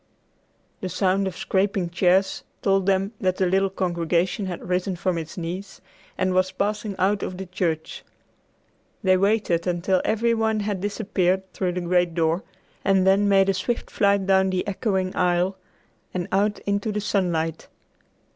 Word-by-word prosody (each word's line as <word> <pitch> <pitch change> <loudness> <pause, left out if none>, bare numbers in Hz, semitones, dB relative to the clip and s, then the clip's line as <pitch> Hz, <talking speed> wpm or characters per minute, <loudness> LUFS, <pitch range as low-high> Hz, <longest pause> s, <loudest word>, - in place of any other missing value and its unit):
The 185 - -4
sound 195 +1 +1
of 185 - -5
scraping 190 -2 0
chairs 185 +2 +2 0.2
told 195 -1 +2
them 195 +1 +2
that 185 -1 +1
the 190 - +2
little 195 +2 +2
congregation 180 +1 0
had 180 -1 -6
risen 180 +1 0
from 180 +1 -1
its 160 +2 -8
knees 180 +3 -5 0.4
and 185 -1 +1
was 185 0 +2
passing 210 +1 -2
out 195 +1 +1
of 185 - -4
the 190 - -5
church. 175 -4 -3 1.0
They 185 -1 +5
waited 195 -3 +1
until 180 +1 +1
every 230 +2 +1
one 220 -1 +1
had 200 -2 -2
disappeared 190 -2 0
through 180 -2 -1
the 180 - -2
great 175 -1 +1
door, 165 +1 +1 0.4
and 190 -1 +3
then 200 +1 +4
made 195 -1 +4
a - - +3
swift 190 +6 -3
flight 200 -1 +2
down 190 0 +3
the 185 +1 -1
echoing 190 -2 -1
aisle 180 +1 +1 0.6
and 175 -1 -2
out 205 +2 +2
into 200 +2 0
the 210 - -2
sunlight. 170 -6 -1
190 Hz, 160 wpm, -24 LUFS, 180-200 Hz, 1.0 s, They